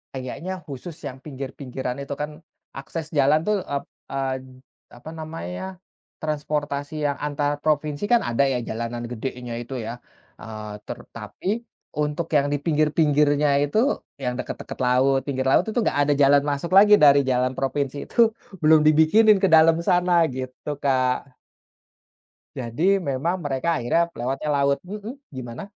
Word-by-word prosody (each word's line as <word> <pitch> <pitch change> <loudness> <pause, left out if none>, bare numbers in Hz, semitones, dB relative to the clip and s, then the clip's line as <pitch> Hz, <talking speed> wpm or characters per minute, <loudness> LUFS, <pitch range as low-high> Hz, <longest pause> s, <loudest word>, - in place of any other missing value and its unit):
Kayaknya 135 +8 -5
khusus 150 +3 -8
yang 130 0 -8
pinggir-pinggiran 135 -2 -6
itu 140 0 -5
kan 150 +1 -5 0.4
akses 155 +3 -6
jalan 150 +1 +3
tuh 210 - +3
ep 140 -1 -2 0.2
eee, 135 -1 -2 0.6
apa 140 - -10
namanya, 155 - -6 0.6
transportasi 150 -1 -2
yang 140 -1 0
antar 145 0 -1
provinsi 150 +1 -1
kan 235 - +5
ada 120 +3 +1
ya 130 -2 0
jalanan 115 +1 -4
gedenya 125 0 -5
itu 130 +3 -7
ya, 120 +2 -6 0.4
eee, 110 -1 -7
ter - - -6 0.2
tapi, 105 - -8 0.5
untuk 150 +3 -1
yang 140 0 +4
di - - +2
pinggir-pinggirnya 150 -2 +3
itu, 145 +9 -1 0.5
yang 125 -1 0
deket-deket - - -6
laut 135 +2 +3
pinggir 130 -1 -1
laut 180 - +4
itu 220 +3 -1
enggak - - 0
ada 145 - +4
jalan 140 +1 +5
masuk 145 +5 -3
lagi 210 +1 +8
dari 140 -6 +6
jalan 125 0 +1
provinsi 140 +1 -1
itu 230 -2 +4 0.3
belum 155 0 +7
dibikinin 160 +8 +6
ke 195 - +6
dalam 160 0 +7
sana 175 -1 +3
gitu, 130 +3 -6
Kak. 130 -1 0 1.2
Jadi 120 +6 -4 0.3
memang 140 +7 0
mereka 135 +2 -2
akhirnya 120 +7 +1 0.2
lewatnya 135 +5 -2
laut. 140 0 +2
Mmm, 210 +5 -6 0.2
gimana? 125 -2 -6
145 Hz, 145 wpm, -24 LUFS, 130-155 Hz, 1.2 s, lagi